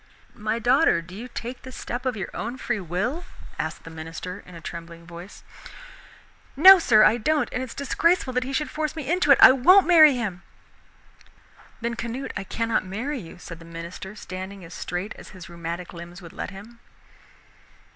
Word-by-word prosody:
"My 215 +1 -2
daughter, 245 - +3
do 180 +2 -13
you 225 +6 -7
take 245 0 -7
this 260 0 -10
step 255 +2 -4
of 250 -3 -1
your 190 - -5
own 235 +3 -5
free 240 -3 -2
will?" 200 - -3 0.4
asked - - -4
the 165 - -10
minister 165 +4 -7
in 180 - -12
a - - -8
trembling 170 0 -9
voice. 175 +3 -11 1.1
"No, 375 +7 +10
sir, 220 -9 +5
I 220 - +5
don't, 305 +6 +1
and 250 - -2
it - - -2
is - - -10
disgraceful 280 0 +1
he 260 +2 -4
should 300 +2 -2
force 310 0 -3
me 305 -5 -6
into 350 -1 +1
it! 275 - +8
I - - +10
won't 360 +10 +6
marry 310 -5 +7
him." 205 -7 -4 1.4
"Then, 235 +1 -2
Canute, 235 +3 -5
I 195 - -4
cannot 230 +3 -1
marry 245 +10 -4
you," 170 -4 -11
said 165 -2 -10
the - - -13
minister, 170 +4 -8
standing 190 -1 -8
as 165 - -11
straight 180 +4 -4
as - - -12
his 180 - -10
rheumatic 170 +1 -6
limbs 170 +1 -10
would 170 -3 -12
let - - -5
him. 220 +5 -12
220 Hz, 185 wpm, -24 LUFS, 175-260 Hz, 1.4 s, No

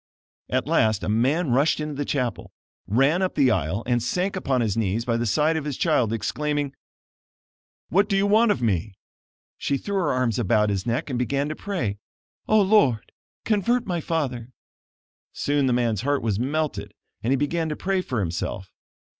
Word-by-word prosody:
At - - 0
last 110 -3 +2
a - - -2
man 130 +8 +1
rushed 140 +6 +3
into 150 0 -3
the 145 0 -3
chapel, 125 -5 -2 0.4
ran 135 - +3
up 185 - -1
the 135 -4 +4
aisle 85 +9 -1
and 120 -1 +1
sank 180 - -1
upon 135 -9 0
his 110 -4 0
knees 115 +1 -1
by 115 - 0
the 115 0 -1
side 155 +8 +2
of 160 - -2
his 145 -3 -4
child, 145 -10 +2
exclaiming: 145 +4 -2 1.2
"What 200 +4 +2
do 195 - +2
you 195 - +2
want 215 +3 +4
of 200 -12 0
me?" 100 -2 0 0.6
She 140 - 0
threw 200 +8 -3
her 175 -6 +1
arms 125 -3 0
about 105 -1 +2
his 100 +2 -2
neck, 120 +4 -1
and 125 - -1
began 140 +4 0
to 155 - -4
pray: 120 - -3 0.5
"Oh, 215 -1 +5
Lord, 185 - +3 0.3
convert 235 +3 +1
my 175 -5 -2
father!" 130 -8 -2 0.8
Soon 145 -1 0
the - - +2
man's 120 -4 +1
heart 145 +2 0
was 105 -3 0
melted 150 +4 -2 0.3
and 120 - -1
he 135 - +3
began 160 +3 -1
to 150 - -2
pray 190 +2 -1
for 125 - -2
himself. 95 +2 -4
135 Hz, 185 wpm, -24 LUFS, 115-160 Hz, 1.2 s, Oh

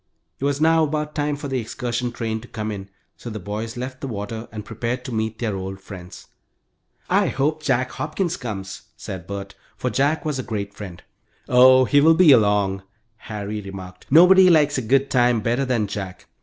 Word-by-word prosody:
It 135 - -2
was 140 0 0
now 160 +1 +4
about 150 0 -2
time 145 0 -1
for 145 0 -6
the 135 -2 -1
excursion 120 +1 -3
train 110 -2 -3
to 120 - -12
come 110 -2 -4
in, 100 -1 -7 0.3
so 120 - -8
the 110 - -6
boys 110 +5 -5
left 130 +1 -6
the 135 - -4
water 110 0 -5
and 105 -1 -7
prepared 120 +3 -4
to 125 - -5
meet 110 0 -2
their 110 -3 -2
old 95 0 -5
friends. 90 -2 -11 0.8
"I - - +2
hope 150 +3 -1
Jack 130 -3 0
Hopkins 170 +3 -2
comes," 95 - -6 0.2
said 95 -3 -7
Bert, 100 0 -6 0.2
for 125 - -2
Jack 145 +7 +1
was 150 -3 -2
a - - 0
great 100 -5 -5
friend. 95 -4 -9 0.4
"Oh, 130 +1 +6
he 145 +2 +4
will 160 +2 +6
be 170 -3 +7
along," 105 -5 +3 0.4
Harry 105 -1 -5
remarked. 95 -2 -10
"Nobody 185 +5 +7
likes 150 -5 +4
a - - -2
good 135 +4 +1
time 120 -2 +3
better 120 +5 0
than 120 -5 0
Jack." 100 -2 -6
120 Hz, 195 wpm, -22 LUFS, 105-140 Hz, 0.8 s, be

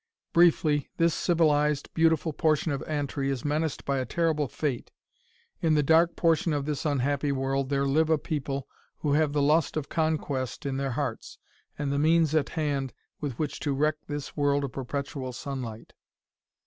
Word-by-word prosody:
"Briefly, 155 -4 +4
this 165 -1 +3
civilized, 150 -4 +1
beautiful 160 -1 +2
portion 155 +1 +1
of 140 - -2
Antri 145 -2 -2
is 135 -1 -3
menaced 155 +1 -1
by 140 -1 0
a - - 0
terrible 160 -3 +1
fate. 130 -1 -3 0.7
In 160 -2 +3
the 150 - +3
dark 165 +3 +4
portion 165 -1 +2
of 145 -1 -1
this 150 0 -2
unhappy 140 0 0
world 135 0 -1
there 140 -1 +1
live 155 +3 +2
a 160 - +4
people 140 -2 -3 0.3
who 145 -2 +1
have 150 0 +3
the 145 -1 +1
lust 155 +2 +2
of 140 -2 -3
conquest 150 -6 -1
in 135 -1 -1
their 135 -2 -2
hearts 130 -4 -4 0.4
and 145 -1 -2
the 140 - 0
means 160 0 +3
at 155 -3 +2
hand 140 -4 -1 0.3
with 140 -6 -4
which 150 -2 -3
to 145 - -1
wreck 150 +2 +1
this 145 -2 -5
world 145 -1 +2
of 135 - -3
perpetual 135 0 -4
sunlight. 125 -4 -6
145 Hz, 175 wpm, -27 LUFS, 140-155 Hz, 0.7 s, Briefly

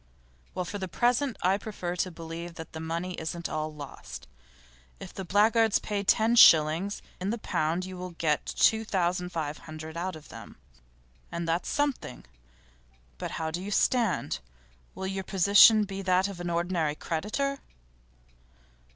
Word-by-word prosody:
'Well, 180 -1 -2
for 205 +3 -5
the 190 - -3
present 245 - +1
I 190 +3 +3
prefer 185 -5 -5
to 185 - 0
believe 165 0 -8
that 160 -2 -9
the 160 - -6
money 165 +3 -3
isn't 170 +2 -4
all 155 0 -3
lost. 145 -2 -9 0.7
If - - -9
the 190 - -6
blackguards 220 +3 +3
pay 205 -1 -3
ten 220 +4 +3
shillings 165 +3 +6 0.2
in 190 +2 -2
the 230 - -1
pound 170 -3 -1
you 185 0 -8
will 180 0 -6
get 150 -3 +1
two 220 0 +3
thousand 180 -3 -1
five 155 -4 -4
hundred 155 0 -9
out 180 +1 -3
of 155 -1 -13
them, - - -11 0.7
and 170 0 -4
that's 165 +2 -1
something. 290 - -2 0.9
But - - -4
how 160 -1 -2
do 175 +3 -4
you 195 - -5
stand? 205 - +1 0.6
Will 190 - -5
your 190 0 -3
position 200 +4 +6
be 195 -1 -5
that 185 0 +2
of 195 -3 -8
an 175 0 -3
ordinary 170 -3 0
creditor? 215 - -2
180 Hz, 160 wpm, -28 LUFS, 165-205 Hz, 0.9 s, shillings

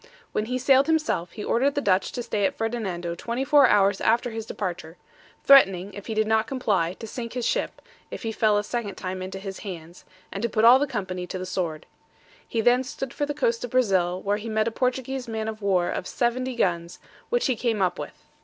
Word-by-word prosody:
When 215 - -1
he 250 +3 -2
sailed 270 +2 +4
himself, 310 - 0
he 210 - -6
ordered 275 +4 +1
the - - +2
Dutch 195 -8 +1
to 245 - -3
stay 210 -3 -2
at - - -6
Ferdinando 195 -7 -3
24 260 +8 +3
hours 200 -2 +3
after 235 +2 +2
his 225 0 -6
departure; 175 -4 -5 0.5
threatening, 195 -8 +5
if 205 - -9
he 220 - -3
did 215 0 +2
not 220 0 +2
comply, 200 -10 0
to 225 - -9
sink 230 +1 -6
his 250 -2 -2
ship, - - -1 0.3
if - - -7
he 225 - -2
fell 215 -1 +2
a 205 - 0
second 210 -3 -4
time 185 0 -5
into 190 +1 -5
his 195 0 -7
hands, 175 -3 -9 0.3
and 195 - -5
to 235 - 0
put 220 +1 +2
all 245 +3 +8
the 290 - 0
company 185 -7 -4
to 185 - -5
the 185 - -5
sword. 175 -4 -3 0.6
He 225 - -1
then 245 +3 +4
stood 265 0 -6
for 290 - -2
the 290 - -3
coast 235 -5 0
of 245 - -4
Brazil, 190 -8 +2
where 200 +2 0
he 220 +2 -6
met 215 0 +1
a - - 0
Portuguese 255 +1 -2
man 220 -1 -3
of 220 0 -5
war 185 -3 +1
of 185 - -4
70 255 +1 -1
guns, 170 -5 -1 0.3
which 485 0 +1
he 260 - +2
came 225 -2 -1
up 185 -2 0
with. - - -9
220 Hz, 225 wpm, -25 LUFS, 190-245 Hz, 0.6 s, all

